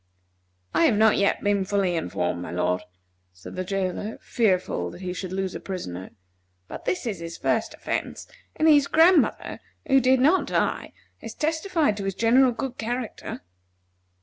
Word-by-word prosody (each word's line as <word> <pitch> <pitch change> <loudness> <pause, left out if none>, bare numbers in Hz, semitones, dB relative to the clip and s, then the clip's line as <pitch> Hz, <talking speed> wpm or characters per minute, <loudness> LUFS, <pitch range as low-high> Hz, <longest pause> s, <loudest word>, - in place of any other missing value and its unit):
"I 165 - +4
have 210 - +3
not 220 0 +5
yet 200 - +1
been 205 -1 +2
fully 190 -2 0
informed, 90 - -2
my - - -6
lord," 90 +1 0 0.5
said 90 +1 -11
the 185 - -2
jailer, 195 +3 -3
fearful 185 - 0
that 180 - -11
he 180 -1 -4
should 185 0 -6
lose 190 0 -2
a - - -5
prisoner; 95 - -6 0.6
"but - - -9
this 365 - -1
is 210 -7 -3
his 170 0 -7
first - - -1
offence, - - -4 0.3
and 315 - +2
his 290 -3 +6
grandmother, 330 +1 +3 0.3
who 270 -3 +4
did 260 +1 +4
not 310 +9 +3
die, - - -1 0.3
has - - -8
testified 320 - 0
to 200 - -4
his 195 -1 -2
general 245 +4 +4
good 250 +1 -5
character." 240 +1 -4
205 Hz, 165 wpm, -25 LUFS, 180-260 Hz, 0.6 s, his